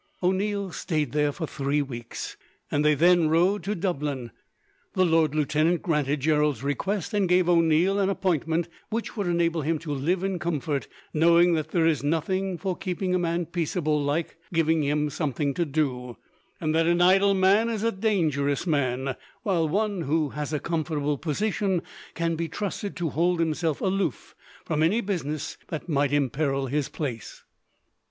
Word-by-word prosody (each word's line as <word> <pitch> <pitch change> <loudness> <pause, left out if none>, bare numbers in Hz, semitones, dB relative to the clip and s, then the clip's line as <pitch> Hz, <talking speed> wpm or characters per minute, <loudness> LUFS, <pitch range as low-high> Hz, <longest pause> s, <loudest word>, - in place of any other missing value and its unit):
O'Neil 195 +1 0
stayed 155 -6 -2
there 150 0 +1
for 160 +3 -4
three 145 0 -1
weeks, 120 -4 -7 0.4
and 145 - +1
they 150 0 +4
then 170 +1 +4
rode 180 +6 +3
to 205 +1 -1
Dublin. 145 - -2 0.6
The 185 - +3
lord 160 -3 +2
lieutenant 155 +3 +1
granted 150 -3 0
Gerald's 150 -3 +1
request, 190 - -2
and 200 -3 +1
gave 180 0 +4
O'Neil 170 +3 +3
an 195 -1 +2
appointment 170 -3 0 0.2
which 225 +1 -3
would 205 -4 -2
enable 170 -1 +1
him 160 +2 0
to 150 -1 -5
live 170 +7 0
in 195 -2 -1
comfort; 155 -4 -2 0.3
knowing 170 +2 +5
that 155 -1 -1
there 165 0 +2
is 155 -6 +2
nothing, 180 +5 0
for 185 0 -2
keeping 185 0 -2
a 185 - +2
man 170 0 0
peaceable, 160 -2 -1
like 145 +4 -1
giving 165 -1 +2
him 150 +1 0
something 145 -1 -1
to 170 - 0
do; 130 -6 -2 0.4
and 155 - 0
that 165 0 +3
an 175 0 +3
idle 195 +2 +5
man 195 +4 +4
is 220 -2 -2
a 230 - +2
dangerous 165 -9 0
man, 135 -4 0 0.3
while 175 -7 +1
one 205 +1 0
who 155 0 0
has 150 +1 -4
a 150 - 0
comfortable 150 -3 -1
position 190 +2 0 0.3
can 165 0 0
be 165 +1 -2
trusted 205 +2 -4
to 175 -2 -2
hold 175 +2 +1
himself 160 -1 0
aloof 190 -6 -1 0.3
from 155 -1 -1
any 175 +9 +3
business 160 -9 -3
that 155 +1 -5
might 145 -3 +1
imperil 140 0 0
his 140 +2 -1
place. 120 - -5
165 Hz, 165 wpm, -26 LUFS, 150-180 Hz, 0.6 s, knowing